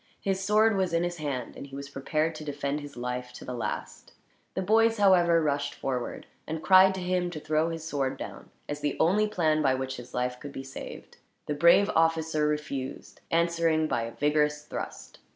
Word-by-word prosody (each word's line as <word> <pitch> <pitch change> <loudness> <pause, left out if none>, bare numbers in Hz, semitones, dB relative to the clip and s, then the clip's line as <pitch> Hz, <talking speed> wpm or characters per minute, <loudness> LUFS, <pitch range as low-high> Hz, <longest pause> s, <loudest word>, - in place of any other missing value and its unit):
His 195 -1 -1
sword 215 +2 +4
was 190 -3 0
in 170 +1 +2
his 175 0 -2
hand, 140 -6 -4
and 140 - -8
he 135 - -10
was 140 0 -6
prepared 155 +4 -1
to 155 - -8
defend 145 0 -2
his 145 -3 -10
life 125 0 -4
to - - -10
the 125 - -5
last. 120 - -5 0.4
The 190 - -1
boys, 225 +3 +4
however, 175 -5 +5
rushed 140 -1 -1
forward; 125 -2 -3 0.2
and 160 0 -4
cried 190 0 +7
to 190 - -4
him 180 0 0
to 165 -3 -6
throw 155 +2 +1
his 165 -1 -5
sword 135 -4 -1
down, - - -8 0.2
as 145 0 -4
the 145 -1 -2
only 210 +6 +3
plan 160 -7 +1
by 135 -3 +3
which 130 0 -4
his 120 0 -10
life 125 0 -1
could 145 -1 -8
be 135 - -6
saved. 135 - -9 0.3
The 150 - -2
brave 170 +6 +5
officer 160 -1 +2
refused, 150 -3 -4
answering 165 -1 +2
by 120 - 0
a 115 - -6
vigorous 150 0 +1
thrust. - - -7
155 Hz, 200 wpm, -28 LUFS, 140-175 Hz, 0.4 s, cried